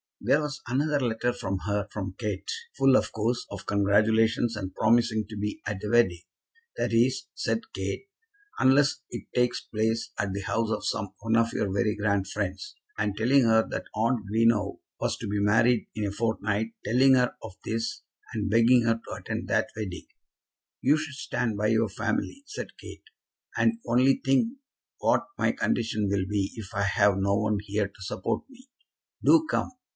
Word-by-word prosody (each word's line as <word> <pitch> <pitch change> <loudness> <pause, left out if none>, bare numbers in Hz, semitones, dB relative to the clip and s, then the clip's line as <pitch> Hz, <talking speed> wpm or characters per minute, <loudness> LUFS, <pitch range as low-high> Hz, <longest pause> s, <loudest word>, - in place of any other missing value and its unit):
There 150 - +3
was 150 0 -4
another 145 +4 +1
letter 120 -1 0
for 105 -6 -3
her 105 0 -1
from 95 -3 -5
Kate, 105 - -4 0.3
full, 135 -1 +5
of - - +2
course, 115 +2 -1
of 100 - -7
congratulations, 110 +3 +3
and 95 -3 -5
promising 115 -1 +2
to 105 - -7
be 105 +10 -3
at 100 -1 -3
the 105 - -4
wedding; 95 -8 +3 0.6
"that - - 0
is," 120 +3 +2
said - - -1
Kate, 390 - -4 0.5
"unless 135 +2 +4
it - - -7
takes 125 0 +1
place 110 +1 -1
at 100 -1 -1
the 100 - -3
house 115 +3 -1
of 110 - -2
some 100 -3 -2
one 115 +1 +1
of 115 0 +2
your 100 - -1
very 105 +2 +1
grand 100 -2 0
friends;" 100 -2 -4 0.2
and 105 -2 0
telling 130 +5 +4
her 110 -1 +4
that - - -3
aunt 115 0 +1
Greenow 110 -1 +2 0.2
was - - -1
to - - -6
be 100 0 -1
married 115 +3 +3
in 105 - -1
a - - -3
fortnight; 110 0 -1
telling 130 +4 +5
her 125 -1 +2
of - - -7
this, 115 +1 -2 0.3
and 105 -2 -2
begging 115 +3 +5
her 115 0 +3
to - - -5
attend - - -5
that - - +1
wedding. 105 -5 -5 0.8
"You 145 +4 +4
should 155 -2 -5
stand 125 -8 -2
by 105 +1 +1
your 110 0 +2
family," 110 - -2
said 420 - -7
Kate. - - -11 0.5
"And 230 - +4
only 130 +3 +3
think 225 - +2 0.4
what - - +2
my - - +2
condition 110 -3 0
will 100 -1 0
be 100 -1 -1
if 110 -4 -8
I 100 - +1
have 100 0 +3
no 100 +1 +2
one 105 0 +1
here 105 0 -1
to 100 0 -20
support 95 0 -2
me. 260 0 -18 0.5
Do 320 -1 +5
come. - - 0
110 Hz, 180 wpm, -27 LUFS, 100-120 Hz, 0.8 s, full